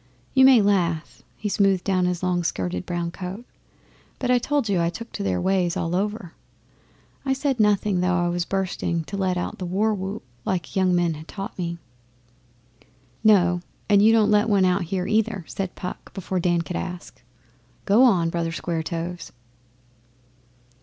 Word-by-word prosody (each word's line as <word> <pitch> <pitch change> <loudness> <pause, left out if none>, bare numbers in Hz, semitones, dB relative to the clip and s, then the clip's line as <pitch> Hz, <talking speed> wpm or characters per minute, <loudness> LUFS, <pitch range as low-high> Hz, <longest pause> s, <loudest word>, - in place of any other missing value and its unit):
You 265 -1 +6
may 255 -5 +7
laugh' 170 -5 0 0.2
he 215 - -4
smoothed 195 -2 +2
down 185 -2 +1
his 180 0 -2
long 180 -1 +1
skirted 90 - -3
brown 175 -1 -2
coat 190 +6 -7 0.7
'but 250 -1 -1
I 250 - +4
told 280 -1 0
you 190 -4 +1
I 170 - +1
took 230 +6 -8
to - - -6
their 95 -2 0
ways 185 - +1
all 165 +1 -1
over. 205 -2 -2 0.9
I 270 -1 +1
said 270 -2 -1
nothing, 205 -2 +2
though 180 0 +1
I 175 0 +1
was 175 0 0
bursting 175 -3 -2
to 195 - -7
let 190 -2 0
out 175 - -4
the 185 - -3
war 210 +5 +1
whoop 195 +2 -5 0.2
like 180 +2 -1
the - - -1
young 185 -1 +3
men 175 -2 +2
had 155 +1 -10
taught 200 +2 -7
me.' 170 -2 -3 1.5
'No, 180 -5 +4 0.3
and 205 -2 +5
you 220 +2 +6
don't 220 -2 +4
let 210 0 +4
out - - -2
one 190 -2 +3
here, 180 +2 -2
either,' 215 -4 0
said 190 -2 -4
Puck 180 - -7
before 190 -1 -2
Dan 175 -1 +1
could 175 - -4
ask. 180 -1 -7 0.6
'Go 210 +4 +4
on, 180 -10 +4
Brother 165 -1 -1
Square 165 0 -2
toes. 170 +1 -5
185 Hz, 180 wpm, -24 LUFS, 175-205 Hz, 1.5 s, may